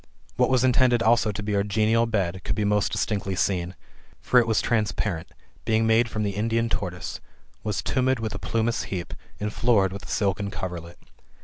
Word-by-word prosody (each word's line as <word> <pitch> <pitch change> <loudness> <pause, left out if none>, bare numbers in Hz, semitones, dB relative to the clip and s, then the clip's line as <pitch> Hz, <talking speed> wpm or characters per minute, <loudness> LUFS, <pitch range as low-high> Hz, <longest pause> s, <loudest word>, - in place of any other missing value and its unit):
What - - +2
was 130 -1 +3
intended 125 -2 +4
also 115 -1 +3
to 105 +1 -5
be 105 0 -1
our 100 - +3
genial 110 +3 +2
bed, 95 -5 -1
could - - -2
be 105 0 0
most 105 0 +1
distinctly 100 -3 -1
seen. 90 -1 -1 0.4
For 125 - +4
it 120 - +1
was 110 -1 +2
transparent, 105 -6 -1 0.4
being 110 0 +2
made 115 +1 +3
from 110 0 -2
the 100 -2 -2
Indian 115 +2 0
tortoise, 90 -5 -4 0.4
was 105 -2 -2
tumid 130 -1 +1
with 110 -1 -3
a 100 - -5
plumous 115 +1 -1
heap, 90 -3 -5 0.3
and 105 0 -3
florid 100 -6 +2
with 100 - -8
a - - -7
silken 100 0 0
coverlet. 90 -4 -6
105 Hz, 190 wpm, -25 LUFS, 100-115 Hz, 0.4 s, intended